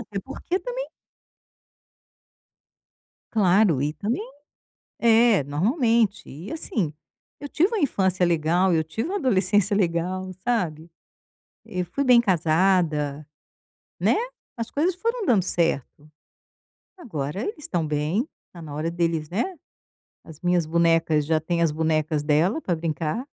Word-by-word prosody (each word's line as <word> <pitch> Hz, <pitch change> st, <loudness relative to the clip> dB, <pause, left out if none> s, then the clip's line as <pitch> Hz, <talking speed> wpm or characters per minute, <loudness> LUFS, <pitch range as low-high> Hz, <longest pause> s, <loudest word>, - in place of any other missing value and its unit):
é -, -, +1 dB
porque 350 Hz, +7 st, -3 dB
também -, -, -5 dB, 2.4 s
Claro 190 Hz, -, +3 dB
e 150 Hz, +1 st, -1 dB
também 210 Hz, -, -2 dB, 0.8 s
é, 230 Hz, -5 st, +5 dB
normalmente. 225 Hz, -, +1 dB
E, 160 Hz, -, -8 dB
assim, 210 Hz, -, -2 dB, 0.5 s
eu 285 Hz, -, -6 dB
tive 345 Hz, +7 st, +2 dB
uma 450 Hz, -, -1 dB
infância 190 Hz, -, +1 dB
legal, 175 Hz, +2 st, +2 dB
eu 160 Hz, -1 st, +2 dB
tive 220 Hz, -, -4 dB
uma 395 Hz, -, -2 dB
adolescência 205 Hz, -, +2 dB
legal, 185 Hz, 0 st, -1 dB
sabe. 170 Hz, -9 st, -1 dB, 0.7 s
Eu 180 Hz, -1 st, -3 dB
fui 280 Hz, +11 st, -2 dB
bem 250 Hz, -2 st, +6 dB
casada, 160 Hz, -5 st, +1 dB, 0.7 s
né, -, -, +3 dB, 0.4 s
as 230 Hz, 0 st, -4 dB
coisas 335 Hz, +5 st, +1 dB
foram 460 Hz, +5 st, -2 dB
dando 210 Hz, -7 st, +4 dB
certo. 155 Hz, -4 st, -2 dB, 0.9 s
Agora 185 Hz, -, -4 dB
eles 340 Hz, -, -4 dB
estão 175 Hz, -, -2 dB
bem, 155 Hz, -, -1 dB, 0.2 s
está 170 Hz, -, -13 dB
na 150 Hz, -3 st, -8 dB
hora 160 Hz, +3 st, -2 dB
deles, 165 Hz, -3 st, -1 dB
né, 275 Hz, -, -2 dB, 0.7 s
as 160 Hz, -2 st, -13 dB
minhas 175 Hz, -2 st, +2 dB
bonecas 165 Hz, -2 st, +2 dB
já 160 Hz, +1 st, +2 dB
têm 170 Hz, +2 st, -1 dB
as 165 Hz, -3 st, +3 dB
bonecas 155 Hz, -1 st, 0 dB
dela 160 Hz, -, +2 dB
para 175 Hz, -, -1 dB
brincar 165 Hz, -, -3 dB
180 Hz, 130 wpm, -24 LUFS, 160-230 Hz, 2.4 s, bem